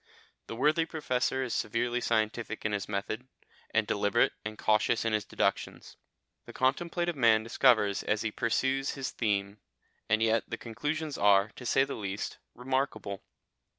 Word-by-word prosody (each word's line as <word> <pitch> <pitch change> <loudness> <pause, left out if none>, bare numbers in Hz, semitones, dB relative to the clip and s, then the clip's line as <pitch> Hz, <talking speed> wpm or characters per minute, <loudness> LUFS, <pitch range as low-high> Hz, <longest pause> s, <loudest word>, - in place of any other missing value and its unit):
The - - -6
worthy 155 +6 +2
Professor 130 -4 -1
is 125 - -3
severely 120 +3 -1
scientific 110 -1 -1
in 110 - +1
his 100 -1 -3
method, 105 +5 -3 0.4
and 110 -1 +1
deliberate 100 +3 +2
and 105 0 -6
cautious 110 +2 +2
in 115 - +1
his 105 -1 0
deductions, - - -2 0.5
the - - -9
contemplative 170 +6 0
man 115 -4 +4
discovers 115 -4 +3
as 105 +1 -1
he 110 - -1
pursues 130 +5 0
his 135 -1 -4
theme, 100 -2 -1 0.5
and 110 +1 +3
yet 115 0 +2
the - - -3
conclusions 150 +6 -4
are, 100 0 +5
to 125 - -7
say 135 - +4
the 135 - -4
least, 100 -1 -5 0.2
remarkable. 125 -6 -2
115 Hz, 150 wpm, -30 LUFS, 105-130 Hz, 0.5 s, are